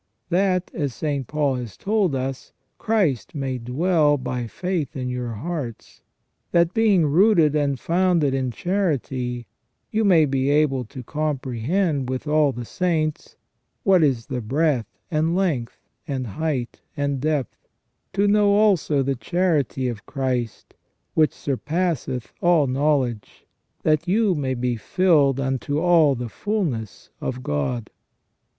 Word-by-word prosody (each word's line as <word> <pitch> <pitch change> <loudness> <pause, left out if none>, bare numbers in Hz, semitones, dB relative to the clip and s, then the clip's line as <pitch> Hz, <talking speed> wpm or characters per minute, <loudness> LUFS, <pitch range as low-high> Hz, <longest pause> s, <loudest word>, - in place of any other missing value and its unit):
That, 185 0 +1
as 145 -6 -2
St. 140 -5 -2
Paul 145 -3 0
has 115 -7 -7
told 200 -7 +1
us, 130 0 -4 0.3
Christ 185 - 0
may 135 -3 -2
dwell 150 +5 +2
by 125 -2 -3
faith 170 - -3
in 125 -1 -3
your 125 -2 -3
hearts, 130 -1 -6 0.5
that 170 0 +3
being 210 -7 +4
rooted 165 -1 +4
and 140 -3 0
founded 170 -4 +2
in 130 -1 0
charity, 130 - -2 0.5
you 220 0 +1
may 175 -6 +5
be 135 -1 0
able 145 -4 +2
to 130 +3 -9
comprehend, 145 - -1
with 130 +2 -3
all 150 -1 +3
the 120 -2 -6
saints, 160 0 -1 0.5
what 190 -6 +5
is 130 -7 +2
the 125 -2 -4
breadth 135 +1 +1 0.2
and 160 +2 +1
length, 160 -12 -1 0.3
and 135 -4 -2
height 130 +1 -3 0.2
and 140 -2 -1
depth, 150 -5 -2 0.5
to 200 +1 +2
know 205 0 +4
also 190 -9 +3
the 135 +1 0
charity 150 -3 0
of 115 -4 -6
Christ, 125 -4 -3 0.4
which 155 -1 +3
surpasseth 145 -3 -2
all 175 -4 +4
knowledge, 130 -5 -1 0.4
that 155 +1 +2
you 205 +1 +3
may 135 -5 -1
be 120 -1 -1
filled 145 - +3
unto 135 +2 -1
all 165 -5 +4
the 120 0 -4
fulness 150 - -3
of 130 0 -4
God 70 - -2
145 Hz, 135 wpm, -23 LUFS, 130-175 Hz, 0.5 s, may